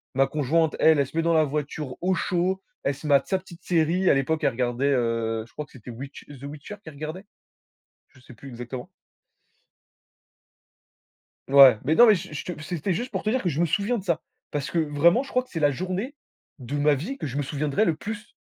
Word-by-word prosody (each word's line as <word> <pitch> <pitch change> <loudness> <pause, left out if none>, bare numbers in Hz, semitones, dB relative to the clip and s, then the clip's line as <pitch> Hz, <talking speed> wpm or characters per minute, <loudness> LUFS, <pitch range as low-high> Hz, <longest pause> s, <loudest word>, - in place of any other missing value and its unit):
Ma 135 0 +4
conjointe, 155 +3 +1
elle, 160 -2 +5
elle 140 - +2
se 160 - -9
met 165 - +2
dans 170 - +2
la 160 -1 +5
voiture 145 -1 -4
au 185 +1 +2
chaud, 185 +1 0 0.2
elle 140 - 0
se 150 - -8
mate 140 -2 +4
sa 190 - +1
petite 175 -2 -15
série, 175 +2 +2
à - - +6
l'époque 145 +4 0
elle - - +3
regardait, 125 +3 0
heu, 115 -2 0
je - - -24
crois 150 - -5
que - - -27
c'était, 125 -1 -12
Witch 135 +4 -9
The 140 -2 -12
Witcher, 145 +7 -8
qu'elle 160 - -10
regardait. 155 +7 -7 0.8
Je 130 -1 -22
sais 125 - -15
plus 135 +4 -12
exactement. 125 +1 -7 2.6
Ouais, 135 -5 +8
mais 155 +5 +2
non, 240 - +9
mais 215 - +7
je 180 -1 -7
je 150 - -5
te 175 -4 -6
c'était 175 +3 -2
juste 245 +7 -3
pour - - -2
te 215 - 0
dire 255 0 0
que 175 - +1
je 155 +1 -3
me 175 - +4
souviens 205 +9 0
de 195 - -6
ça! 170 -3 0 0.3
Parce 145 -1 -3
que 170 - -2
vraiment 160 - +3
je 275 - -11
crois 255 0 +1
que - - -25
c'est 165 - -4
la 145 -1 +3
journée 185 - -4 0.4
de 135 +4 -4
ma 145 +1 +4
vie 225 - -5
que 155 - -4
je 130 - -6
me - - +1
souviendrai 145 +6 0
le 165 -7 +1
plus! 210 +2 -7
155 Hz, 230 wpm, -25 LUFS, 135-180 Hz, 2.6 s, non